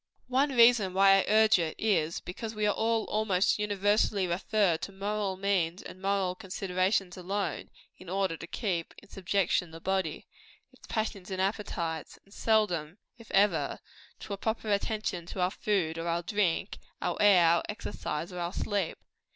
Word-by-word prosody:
One 270 +3 +2
reason 230 -6 +5
why 195 0 +6
I - - 0
urge 215 -1 +5
it 160 -2 -2
is, 170 -7 0
because 215 +5 -6
we 210 0 0
are 205 - +3
almost 215 -4 +1
universally 205 -1 +1
referred 180 -1 +1
to - - -5
moral 200 0 -2
means 190 -2 0
and 185 - -10
moral 195 -2 0
considerations 185 0 -1
alone, 195 +3 -3 0.3
in 185 -1 -11
order 190 -2 0
to 170 - -9
keep 180 -7 -3
in 210 - -16
subjection 185 -2 0
the 165 0 -10
body 190 +2 -2 0.5
its - - -17
passions 215 -4 -3
and 190 -1 -4
appetites 180 -5 -2
and 200 - -19
seldom, 185 -7 +1 0.2
if 230 - -14
ever, 200 +1 +2 0.4
to - - -6
a - - -4
proper 220 +1 -2
attention 200 -4 -1
to 185 - -7
our 180 +1 +2
food 175 -7 -1
or 165 - -4
our 170 +1 0
drink, 195 -1 -1 0.2
our - - -1
air, 195 -4 +6
our 170 +1 +4
exercise, 175 -5 -4
or 180 - -5
our 175 +1 -3
sleep. 200 -5 -2
195 Hz, 165 wpm, -29 LUFS, 180-210 Hz, 0.5 s, why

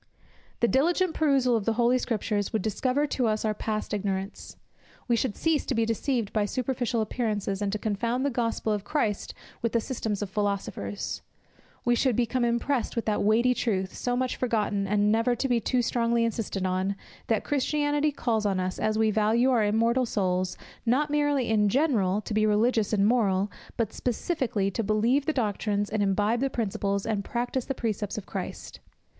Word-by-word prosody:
The 235 - +5
diligent 335 +7 +2
perusal 275 -6 +3
of 215 -3 -1
the 230 - +2
Holy 240 +2 +3
Scriptures 210 -4 -1
would 215 -4 -1
discover 255 +6 0
to 260 -4 0
us 215 0 0
our 215 - +1
past 215 0 -3
ignorance. 195 -1 -3 0.5
We 240 - +3
should 230 -2 -1
cease 325 -3 +1
to 265 - 0
be 225 0 +2
deceived 230 -1 -1
by 210 -2 +2
superficial 245 0 -1
appearances, 210 -3 -2
and 200 -1 0
to 215 - -1
confound 230 +5 -1
the 285 - +1
Gospel 230 -2 -1
of 205 -2 -2
Christ 215 -9 -1 0.3
with 230 - -1
the 230 - +3
systems 220 -4 -3
of 200 - -5
philosophers; 200 - -3 0.6
we 240 - +4
should 245 0 +2
become 245 +2 +1
impressed 235 +2 0
with 230 - -1
that 215 -1 0
weighty 230 +4 +4
truth, 195 -6 -1
so 245 0 -1
much 255 0 -1
forgotten, 210 -5 0
and 205 +1 +2
never 230 +3 +2
to 270 - -1
be 245 -2 +2
too 245 +2 0
strongly 235 0 +1
insisted 215 -4 -2
on, 185 +2 0 0.3
that 225 -3 +1
Christianity 290 +1 +1
calls 230 -6 -1
on 195 -2 +1
us, 185 0 -2
as 215 0 0
we 220 -1 +3
value 220 +5 +3
our 235 -4 +3
immortal 230 +4 +2
souls, 185 -3 0 0.3
not 275 +5 +1
merely 290 -3 +1
in 210 -2 +3
general, 215 - +2
to 215 - -5
be 215 0 +3
religious 215 +1 +2
and 200 -2 +3
moral, 205 -4 +2 0.3
but 225 -3 -1
specially 240 - -1
to 230 - -2
believe 230 +7 +2
the - - +3
doctrines, 205 -5 -1
and 215 -1 0
imbibe 205 +4 +2
the 270 +1 +1
principles, 200 -4 -1
and 210 -3 -1
practise 245 +3 -2
the 270 - -3
precepts 215 -4 -2
of 205 - -5
Christ. - - -6
225 Hz, 185 wpm, -27 LUFS, 205-250 Hz, 0.6 s, The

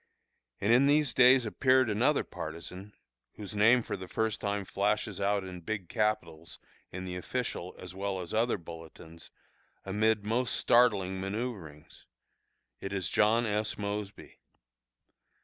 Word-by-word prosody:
And 105 +4 +2
in 130 +3 +5
these 145 -3 +3
days 125 0 +6
appeared 130 +3 +3
another 120 +8 +2
partisan, 90 +5 -8 0.4
whose 105 -1 -8
name 115 +4 +4
for - - -4
the 95 -1 -8
first 110 +2 -1
time 100 -1 -2
flashes 105 +1 -1
out 100 0 +1
in 90 -2 -8
big 95 0 -5
capitals 105 -8 -2 0.3
in 90 +1 -6
the 90 -1 -5
official 90 -1 -4
as 90 0 -9
well 95 0 -3
as 90 -2 -6
other 115 +1 +1
bulletins, 80 -1 -12 0.6
amid 105 +2 +1
most 120 +3 0
startling 100 -6 +3
manoeuvrings: 95 -7 -6 0.7
it 95 - -6
is 95 -5 -1
John 115 +3 +3
S. 105 0 -1
Mosby. 100 0 -6
105 Hz, 135 wpm, -30 LUFS, 95-115 Hz, 0.7 s, days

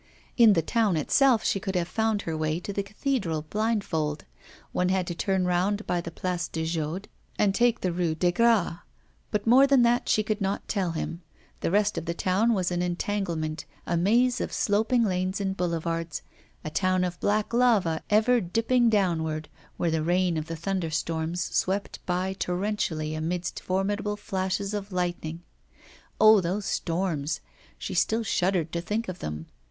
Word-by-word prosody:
In 230 -4 +7
the 165 -4 +1
town 215 -3 +1
itself 245 - +3
she 195 - +1
could 190 0 -4
have 175 -1 0
found 220 0 0
her 165 - -3
way 155 +1 -1
to 200 - -5
the 200 - 0
cathedral 200 - -2
blindfold; 195 -9 -1 0.5
one 180 0 +1
had 185 -1 +1
to 175 - -3
turn 190 +2 0
round 190 +4 0
by 175 - 0
the 170 - -6
Place 175 +1 -3
de 160 0 -3
Jaude 165 +3 -3 0.3
and 200 -2 +3
take 240 +1 +2
the 185 - 0
Rue 170 -2 0
des 175 +2 +2
Gras; 210 -4 +2 0.5
but 210 -1 -1
more 260 +4 +6
than 275 -3 +5
that 240 +1 +2
she 215 - +3
could 215 0 -2
not 195 +1 -2
tell 185 -5 -1
him; 170 +1 -4 0.4
the - - -1
rest 205 -1 +2
of 165 - -9
the 170 0 -2
town 205 +7 +2
was 180 -2 0
an 175 0 0
entanglement, 175 -4 -2 0.2
a 175 - -1
maze 235 +8 +3
of - - -3
sloping 220 +4 +2
lanes 185 -1 -1
and 190 -1 -1
boulevards; 165 -2 -2 0.4
a 155 - -4
town 185 +2 +1
of 180 -1 -3
black 215 +2 0
lava 220 -10 +3
ever 225 +3 +4
dipping 230 +6 +2
downward, 160 -7 0 0.3
where 170 - 0
the 160 -1 0
rain 175 +1 +1
of 155 0 -3
the 165 - -4
thunderstorms 165 -1 -2
swept 195 +3 -2
by 185 +1 0
torrentially 180 -5 -2
amidst 170 +3 -3
formidable 205 +2 -1
flashes 195 +1 -2
of 205 -1 -4
lightning. 175 -2 -3 0.8
Oh! 215 -2 +7
those 190 +4 -2
storms; 165 -4 -1 0.4
she 195 - -5
still 220 +5 +1
shuddered 180 -5 0
to 170 - -2
think 215 +6 -2
of 185 -1 -6
them. 75 +1 -5
185 Hz, 175 wpm, -27 LUFS, 170-210 Hz, 0.8 s, In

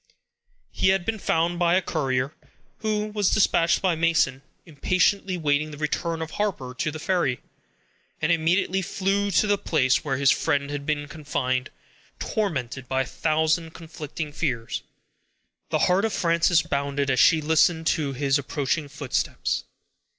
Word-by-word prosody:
He - - 0
had 190 -2 +2
been 225 -1 -2
found 170 0 0
by 175 0 +3
the 190 - +3
courier 130 -3 -1 0.5
who 215 -1 -1
was 210 -2 0
dispatched 170 -5 +3
by 185 -2 +3
Mason, 160 -5 +1 0.2
impatiently 185 +4 +1
waiting 150 -1 +1
the 150 - -9
return 160 +2 -2
of 160 - -8
Harper 170 -12 -2
to 130 - -2
the 155 - -6
ferry, 155 -6 0 0.8
and - - +1
immediately 175 +4 +1
flew 195 +2 0
to 200 - +3
the 205 -1 +1
place 135 -5 +1
where 135 -3 -1
his 140 0 +4
friend 145 -2 0
had 145 0 -5
been 145 -1 -1
confined, 140 -4 -2 0.5
tormented 130 - -3
by 130 +1 0
a - - -8
thousand 160 +4 0
conflicting 155 -2 -7
fears. 130 -8 -2 0.9
The - - +1
heart 185 +2 +2
of 220 - -1
Frances 170 0 +3
bounded 140 0 -1
as 130 - +1
she 165 - +6
listened 160 +2 +2
to 150 -4 0
his 135 +1 +1
approaching 145 +2 -2
footsteps. 140 -2 -2
160 Hz, 150 wpm, -25 LUFS, 140-175 Hz, 0.9 s, she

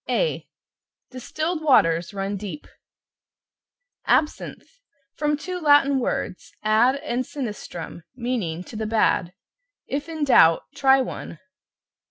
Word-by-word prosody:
A - - 0 0.6
Distilled 310 +6 -3
waters 170 - +3
run 195 0 -3
deep. 205 +8 -7 1.4
=ABSINTHE= 320 +10 -1 0.3
From 295 0 0
two 360 +4 -5
Latin 290 -3 +4
words, 210 -6 -3
ad, 220 +5 +4
and 275 -3 -2
sinistrum, 210 - -7
meaning 230 -9 -3
"to 220 - -12
the 220 0 -3
bad." 215 -5 +1 0.5
If 285 +3 -4
in 315 -2 -3
doubt, 165 - +5
try 270 -1 +4
one. 205 -9 -6
255 Hz, 110 wpm, -23 LUFS, 205-295 Hz, 1.4 s, doubt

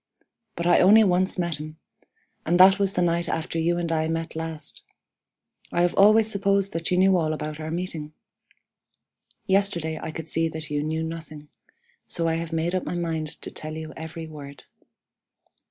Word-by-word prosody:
But 170 - -4
I 175 - +5
only 210 +4 +7
once 185 -1 +1
met 170 -3 -1
him, 155 +1 -8 0.7
and 175 +2 +1
that 190 +2 +7
was 195 -1 +1
the 180 - +1
night 170 0 0
after 165 0 -2
you 170 +1 +1
and 170 -1 -2
I 160 -1 0
met 165 0 -3
last. 160 -2 -6 0.9
I 175 - +2
have 175 - +2
always 215 +2 +6
supposed 200 -2 +1
that 165 +2 -2
you 180 - +1
knew 190 +1 +5
all 160 -3 +1
about 150 0 -5
our 155 0 -5
meeting. 165 -3 -4 1.3
Yesterday 175 -5 +1
I 160 - -5
could 160 0 -7
see 165 +1 0
that 160 -1 -8
you 145 0 0
knew 160 +2 -2
nothing. 160 -2 -8 0.6
So 165 -1 0
I 165 - +1
have 165 0 -5
made 165 +2 -1
up 185 - 0
my - - -4
mind 165 -2 -2 0.2
to - - -6
tell 155 0 -7
you 160 0 -7
every 160 +1 -7
word. 145 -3 -10
165 Hz, 185 wpm, -25 LUFS, 160-180 Hz, 1.3 s, only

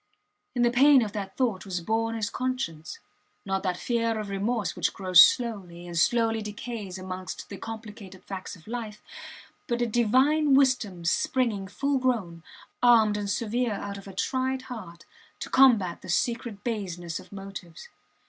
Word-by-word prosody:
In 240 - +2
the 240 - +4
pain 270 +1 +6
of 210 - -4
that 200 -2 -6
thought 230 -8 0
was 185 -3 -3
born 225 +5 -1
his 215 -2 -2
conscience; 255 - -3 0.5
not 195 -1 -1
that 180 -2 -1
fear 230 -1 0
of 210 -1 -5
remorse 205 +2 -1
which - - -1
grows 185 -2 +7
slowly, 190 -8 0
and 175 -1 -7
slowly 225 +5 +2
decays 210 -2 -6
amongst 185 0 -6
the 200 - -7
complicated 210 -4 -9
facts 190 -2 -7
of 165 - -18
life, 220 -2 -6 0.6
but 240 0 -1
a 240 - +2
Divine 260 +6 +3
wisdom 240 -10 +2
springing 210 +1 0
full 275 +7 -1
grown, 215 -10 -1 0.4
armed 225 -4 +5
and 205 -1 -3
severe 230 +2 0
out 200 0 -5
of 195 - -13
a 195 - -9
tried 260 +4 -1
heart, 170 -7 -10 0.3
to - - -6
combat 230 -10 +4
the - - -11
secret 230 +1 -1
baseness 175 -8 -4
of - - -15
motives. 195 -4 -9
215 Hz, 160 wpm, -27 LUFS, 190-240 Hz, 0.6 s, grows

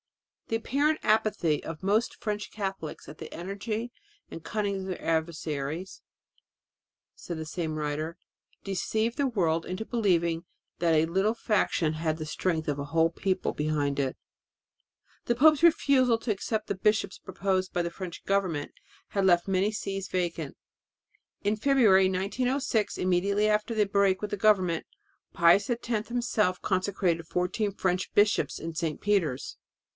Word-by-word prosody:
"The 225 - -1
apparent 290 +7 +1
apathy 210 -8 +2
of 165 +2 -7
most 210 +4 +1
French 210 -1 -3
Catholics, 195 -6 -5
the 150 - -9
energy 210 +6 -4 0.4
and 165 - -9
cunning 205 +1 -1
of - - -6
their 185 - -4
adversaries," 160 0 -2 1.1
said 170 - -6
the 160 - -5
same 155 0 -3
writer, 155 +2 -3 0.5
"deceived 220 +4 -1
the 280 - +1
world 170 -9 +1
into 185 +4 -4
believing 170 -8 +1 0.4
that 165 -2 +3
a 155 +1 +4
little 190 +7 +1
faction 190 -8 +1
had 155 0 -1
the 155 - -5
strength 160 0 -1
of 145 -1 -1
a 140 - -3
whole 165 +2 +2
people 185 +2 -1
behind 150 -2 -1
it... 135 -2 -1 0.5
." - - -39
The 240 - +2
pope's 305 +4 +5
refusal 275 -7 +4
to 225 0 -2
accept 215 +2 -2
the - - -1
bishops 205 0 +1
proposed 185 0 -1
by 175 - 0
the 170 - -3
French 180 -1 -8
government 185 -7 0 0.4
had 195 -1 0
left 175 -1 +4
many 195 +2 +2
sees 195 -2 -4
vacant. 170 -5 -2 0.9
In 205 +2 +2
February 215 -6 +4
1906, 220 +4 0
immediately 195 +3 +2
after 215 +2 +1
the 210 -1 +3
break 195 -1 +2
with 210 0 -4
the 205 - -1
government, 190 -5 +3 0.5
Pius 170 +5 +4
X 240 -1 -2
himself 225 -4 0
consecrated 185 -3 0
fourteen 180 +5 -1
French 185 -1 -1
bishops 205 0 +2
in 165 +1 -5
St. 160 -2 -2
Peter's. 175 -11 0
190 Hz, 150 wpm, -28 LUFS, 165-215 Hz, 1.1 s, pope's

